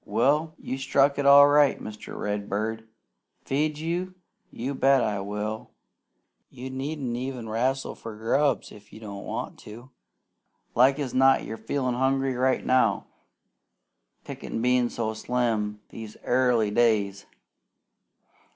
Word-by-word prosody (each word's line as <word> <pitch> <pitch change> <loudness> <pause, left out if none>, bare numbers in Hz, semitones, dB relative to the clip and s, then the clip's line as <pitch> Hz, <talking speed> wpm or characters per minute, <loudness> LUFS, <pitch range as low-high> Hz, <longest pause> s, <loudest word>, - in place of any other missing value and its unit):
Well, 145 +9 +1
you 130 - -5
struck 140 +1 +2
it 140 - +1
all 140 0 +9
right, 145 -1 +4
Mr. 105 0 -9
Redbird. 105 +2 -3 0.6
Feed 150 +2 0
you? 175 +4 -3 0.3
You 130 +4 -4
bet 135 -1 +3
I 105 -2 -1
will! 105 +2 -4 0.8
You 130 +2 -8
needn't 135 -2 -4
even 125 -2 -5
'rastle 130 +5 -1
for 115 -2 -9
grubs 135 +6 0
if 105 -1 -15
you - - -12
don't 100 -3 -8
want - - -5
to. 120 +5 -12 0.8
Like 130 +3 +4
as 140 -4 -4
not 135 +1 +4
you're 110 - -6
feelin' 130 +1 -2
hungry 135 +1 +1
right 130 +1 0
now, 130 0 +2 1.2
pickin' - - -6
bein' 125 0 +2
so 110 -2 -3
slim 110 -3 -1
these 110 -1 -9
airly 120 -4 +2
days. 105 -4 +1
125 Hz, 130 wpm, -26 LUFS, 110-135 Hz, 1.2 s, all